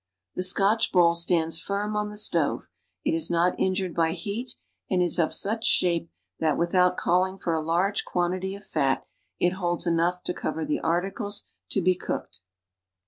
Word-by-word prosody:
The - - -3
Scotch 200 +4 +3
bowl 175 -2 +5
stands 170 -1 +1
firm 205 +3 -2
on 210 0 -1
the 210 - -8
stove, 210 - 0 0.4
it 310 - +2
is 325 -1 +3
not 175 +1 +2
injured 185 -2 0
bv 165 -1 +1
heat, 205 +8 -5 0.3
and 185 - +1
is 175 -1 +1
of 160 - +2
such 220 +3 0
shape 170 -6 +2 0.3
that, 155 -3 +1
wdhout 180 +1 +2
callnig 185 +2 +1
for 170 - -1
a 160 - 0
large 175 +6 +1
quantity 185 +2 -1
of 200 - -13
fat, 135 -4 0 0.3
it 175 - +3
holds 175 -2 -2
enough 170 +1 +1
to - - -2
cover 160 -2 -3
the 150 - -1
articles 195 +5 -1 0.2
to 195 - +1
be 185 +1 +4
cooked. 175 - -5
180 Hz, 175 wpm, -26 LUFS, 170-200 Hz, 0.4 s, bowl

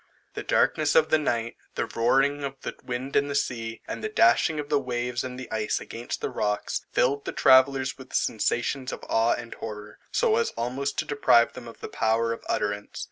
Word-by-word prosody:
The - - -4
darkness - - +2
of 485 - +5
the 155 - +5
night; 120 -5 -1 0.2
the - - 0
roaring 135 +5 +2
of 135 -1 -3
the - - -4
wind 125 +2 -4
and 140 0 +3
the 140 - -2
sea, 115 -4 -2
and - - -5
the 215 - -1
dashing 150 - +4
of 145 - -4
the 145 -1 +2
waves 125 -2 -2
and 130 0 -6
ice 110 -1 0
against 120 +1 -6
the - - -2
rocks, 105 0 -1
filled 140 +2 +1
the - - -2
travellers 130 0 +4
with 130 - -12
sensations 120 +4 0
of - - -7
awe 115 +1 +3
and 120 -1 -7
horror, 105 -1 -8
so 455 -2 +2
as 465 - 0
almost 130 +4 -2
to - - 0
deprive 140 -5 +4
them 125 -2 -9
of 115 - -12
the - - -5
power 115 +1 +1
of - - -9
utterance. 100 0 -2
125 Hz, 200 wpm, -26 LUFS, 115-140 Hz, 0.2 s, of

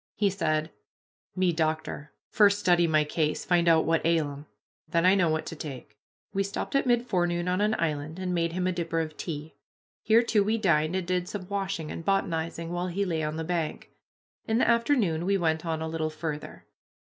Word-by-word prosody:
He 205 -2 +2
said, 155 -4 -1 0.6
"Me 185 -2 +2
doctor 155 -2 -2 0.2
first 205 -1 +5
study 175 -3 +3
my 155 -1 +3
case, 150 0 -1
find 175 -2 +2
out 160 -1 +4
what 165 0 +1
ail 160 -3 +2
'em 140 +1 -10 0.4
then 170 +2 +2
I 185 - +7
know 185 -4 +3
what 155 0 -1
to - - -6
take." 130 -8 -8 0.4
We 195 - +1
stopped 195 0 -3
at 275 -1 +2
mid 240 0 +3
forenoon 175 -4 0
on 180 +2 +1
an 215 +1 +2
island 155 0 -2
and 185 -1 -2
made 170 -1 0
him 180 0 -1
a 185 - +2
dipper 170 -2 -2
of 155 -1 -3
tea. 155 -2 -6 0.5
Here, 225 +2 +4
too, 215 -3 +2
we 220 +3 +1
dined 170 -5 +2
and 190 -2 -1
did 180 0 -1
some 190 -3 -6
washing 195 -5 -3
and 165 - -6
botanizing, 170 -3 -1
while 175 +1 -2
he 195 +3 -1
lay 165 -4 -1
on 155 0 -2
the 160 - -3
bank. 165 -2 -3 0.6
In 225 - +1
the - - +3
afternoon 235 - +2
we 195 +2 +2
went 160 -2 0
on 160 -1 -1
a - - -3
little 160 -1 -2
farther. 155 -1 -6
170 Hz, 210 wpm, -27 LUFS, 160-195 Hz, 0.6 s, I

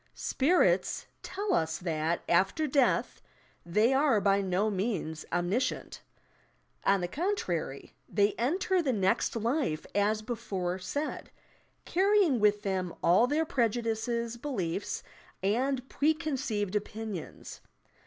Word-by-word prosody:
"Spirits" 260 - +2 0.2
tell 400 0 -2
us 160 0 +1
that, 165 -1 -1
after 190 - +2
death, 275 -3 +1 0.4
they 210 +9 +2
are 270 -5 +4
by 200 0 +3
no 190 +2 +1
means 185 -6 -2
omniscient. 185 +9 -1 0.8
On 195 -1 +3
the 175 - -1
contrary, 180 - -2 0.2
they 205 0 +2
enter 360 - +1
the 270 -6 0
next 190 0 +1
life, 230 - -1
as 210 +1 +1
before 195 -6 -3
said, 285 +12 -4 0.6
earrj'ing 380 - +3
with 210 0 +3
them 185 -3 -2
all 185 +8 +5
their 305 +4 +1
prejudices, 235 -2 -1
beliefs 200 - -3 0.4
and 255 +6 0
pre 305 +4 +2
conceived 255 - -2
opinions. 210 -3 -5
215 Hz, 115 wpm, -30 LUFS, 185-270 Hz, 0.8 s, all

